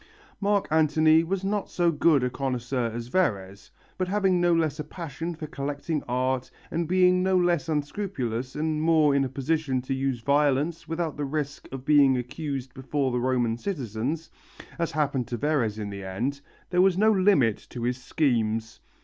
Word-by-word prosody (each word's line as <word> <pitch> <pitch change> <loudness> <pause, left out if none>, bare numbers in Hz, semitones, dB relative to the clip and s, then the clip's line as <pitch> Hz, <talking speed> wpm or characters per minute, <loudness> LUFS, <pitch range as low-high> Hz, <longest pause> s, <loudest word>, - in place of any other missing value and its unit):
Mark 200 -1 +1
Antony 155 +1 +4
was 190 +3 -2
not 205 +1 -1
so 175 -1 +2
good 150 -3 +3
a 125 - +1
connoisseur 125 -2 -2
as 115 +1 -5
Verres, 100 - -1 0.3
but 185 - 0
having 190 -2 +2
no 175 0 +3
less 160 -3 +1
a - - -2
passion 165 +1 -6
for 155 - -6
collecting 145 +1 -3
art 130 +1 -1 0.2
and 165 0 -1
being 180 +1 +4
no 190 0 +2
less 175 -3 +1
unscrupulous 145 - -3
and 155 0 -1
more 155 -3 +4
in 140 0 +3
a 135 - -2
position 135 0 -1
to 135 - -2
use 135 -2 -1
violence 145 +4 +1
without 165 -2 -3
the 145 - -2
risk 145 0 -4
of 135 -1 -7
being 145 -3 +5
accused 130 0 -5
before 135 0 -1
the 125 - 0
Roman 120 -2 0
citizens, 140 - -3 0.5
as 170 - 0
happened 140 -5 0
to 120 - -3
Verres 120 -6 0
in 105 -2 -4
the 100 -1 -7
end, 120 +10 -3 0.3
there 180 0 +4
was 185 -1 +4
no 215 +2 +5
limit 185 - +3
to 120 - -6
his 125 +1 -1
schemes. 115 -6 0
145 Hz, 175 wpm, -26 LUFS, 125-165 Hz, 0.5 s, being